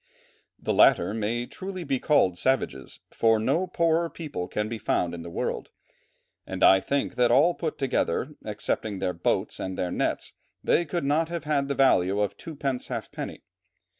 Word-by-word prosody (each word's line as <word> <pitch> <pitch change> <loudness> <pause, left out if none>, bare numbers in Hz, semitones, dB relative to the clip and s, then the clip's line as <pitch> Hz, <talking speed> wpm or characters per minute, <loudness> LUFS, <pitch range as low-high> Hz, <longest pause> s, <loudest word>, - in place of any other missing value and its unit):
"The - - -2
latter 90 +4 +5
may 115 +2 -1
truly 185 +5 -6
be 135 -4 -1
called 110 - +3
savages, 90 - -1
for 115 -1 +3
no 140 +12 +1
poorer 170 -1 +1
people 150 - -5
can 105 0 -2
be 115 0 -5
found 90 -4 0
in 85 - -6
the 85 - -8
world, - - -3 0.7
and - - -4
I 95 - +8
think 140 +7 -1
that 125 -1 +3
all 145 +9 +5
put 160 -2 -4
together, 130 - 0
excepting 105 0 -2
their 95 -1 -1
boats 85 - -1
and 95 0 -4
their 90 - -1
nets, - - -1 0.3
they 175 - +2
could 170 +1 -2
not 155 +3 +1
have 170 -3 -4
had 145 -2 0
the 140 - -1
value 100 -7 +3
of 105 -1 0
two 165 - -9
pence 135 -3 -2
half - - -5
penny. - - -6
130 Hz, 180 wpm, -26 LUFS, 100-155 Hz, 0.7 s, I